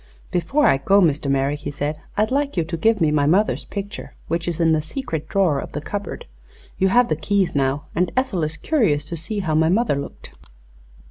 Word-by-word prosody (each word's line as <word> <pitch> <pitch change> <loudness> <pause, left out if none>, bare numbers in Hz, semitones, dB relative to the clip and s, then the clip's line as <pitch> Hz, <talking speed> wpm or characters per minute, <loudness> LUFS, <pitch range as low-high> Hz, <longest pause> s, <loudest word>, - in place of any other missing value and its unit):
"Before 190 - +1
I - - +5
go, 195 +8 +4
Mr. 150 -5 +2
Merrick," 140 +2 +1
he - - -5
said, 145 +2 -3 0.2
"I'd 215 +2 +1
like 280 -3 0
you 170 - +3
to 165 +2 -4
give 220 +6 +2
me 160 -3 +3
my 145 -1 +2
mother's 200 +7 +2
picture, 200 0 -7
which 170 +1 -1
is 170 -1 -2
in 165 -1 +3
the 155 -1 +2
secret 160 - -5
drawer 180 -8 +2
of - - -8
the 150 - -2
cupboard. 205 +6 -5 0.5
You 190 - +4
have 240 +5 +4
the 155 - 0
keys, 190 +4 0
now, 140 +1 0
and 180 0 0
Ethel 255 -9 0
is 155 0 -2
curious 200 - +1
to 170 - -5
see 185 +6 -3
how 165 -5 -1
my 160 +1 +3
mother 210 - +2
looked." 140 - -8
170 Hz, 215 wpm, -22 LUFS, 150-205 Hz, 0.5 s, I